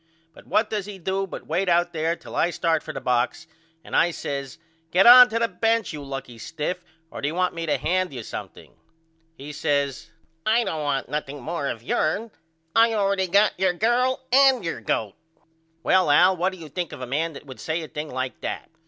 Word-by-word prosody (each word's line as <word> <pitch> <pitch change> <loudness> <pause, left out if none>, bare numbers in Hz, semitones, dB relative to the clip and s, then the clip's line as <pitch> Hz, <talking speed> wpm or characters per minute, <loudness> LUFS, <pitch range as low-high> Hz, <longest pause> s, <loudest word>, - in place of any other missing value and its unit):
But - - -17
what 215 - +2
does 210 -2 -2
he 205 -2 -8
do 190 +2 -2
but - - -8
wait 180 +4 0
out 175 0 +2
there 165 +1 0
till - - -11
I - - +2
start 165 -2 0
for 155 - -7
the - - -5
box 125 -1 0 0.4
and - - -6
I 175 - +4
says 140 -5 -5 0.3
Get 180 +4 +4
on 250 +1 +10
to 225 - -1
the 230 0 +2
bench 225 +2 0
you 150 -2 -7
lucky 135 -4 -7
stiff 165 +7 -4 0.3
or - - -7
do 140 - -1
you 155 - -3
want 180 0 +1
me 165 0 -5
to 150 - +1
hand 185 +1 0
you 125 -4 -7
something? - - -9 0.6
He 145 +2 -8
says 140 -2 -1 0.3
I 225 +4 +3
don't 160 -8 -3
want 145 -3 -1
nothing 145 +1 -4
more 160 -2 -3
of 115 -4 -5
yourn. 205 - -1 0.4
I 230 +1 +6
allready 195 -2 +1
got 205 +2 +4
your 190 -1 +2
girl 245 +7 +1
and 265 -5 +5
your 165 -8 -3
goat. 105 -1 -1 0.7
Well 185 -4 +3
Al 180 +6 +5
what 185 +2 0
do 185 - -10
you 160 -3 -10
think 175 +2 -4
of 130 - -9
a - - -3
man 155 +6 -2
that 150 - -11
would 130 -2 -11
say 160 +1 -2
a - - -7
thing 150 +1 -6
like 130 0 -4
that? - - -5
170 Hz, 215 wpm, -24 LUFS, 145-195 Hz, 0.7 s, on